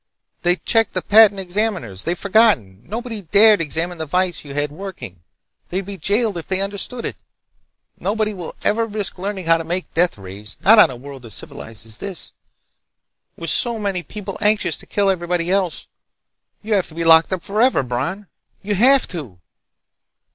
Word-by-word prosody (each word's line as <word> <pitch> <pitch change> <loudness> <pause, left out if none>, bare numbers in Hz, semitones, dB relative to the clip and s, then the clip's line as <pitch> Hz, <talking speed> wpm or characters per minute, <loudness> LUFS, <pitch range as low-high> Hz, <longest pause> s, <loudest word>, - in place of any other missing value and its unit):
They 175 0 +3
checked 225 +4 +1
the - - -2
patent 210 -2 +6
examiners. 180 - -2
They've 175 +1 -1
forgotten. 195 - +2
Nobody 225 -1 -5
dared 205 +3 +5
examine 165 +3 -2
the 160 - -2
device 180 +3 -1
you 140 -2 -9
had 145 0 -1
working. 155 - -9 0.5
They'd 190 +2 -3
be 200 0 -7
jailed 205 +2 +1
if 165 - -10
they 190 0 0
understood 200 +5 -2
it! - - -5 0.8
Nobody 215 +1 -1
will 180 -4 -8
ever 225 +2 +1
risk 205 -3 -2
learning 195 -1 -4
how 165 0 +4
to 165 - -5
make 175 +3 -4
deathrays—not 105 - +2
on - - +7
a 130 - -7
world 135 +1 -11
as 110 - -4
civilized 110 0 -7
as 110 -1 -2
this, 195 -3 -5 1.0
with - - -1
so 235 -2 +3
many 200 -4 -2
people 195 +1 -8
anxious 210 0 +2
to - - -14
kill 205 -1 0
everybody 175 -1 -2
else. 190 -3 0 0.8
You 215 +1 -1
have 195 -3 +1
to 155 - -12
be 165 - -1
locked 165 +1 +6
up 185 -2 -2
forever, 215 - +2
Bron. 135 +12 -3 0.4
You 205 +1 -1
have 260 +7 +5
to!" 135 - -7
185 Hz, 170 wpm, -20 LUFS, 160-210 Hz, 1.0 s, on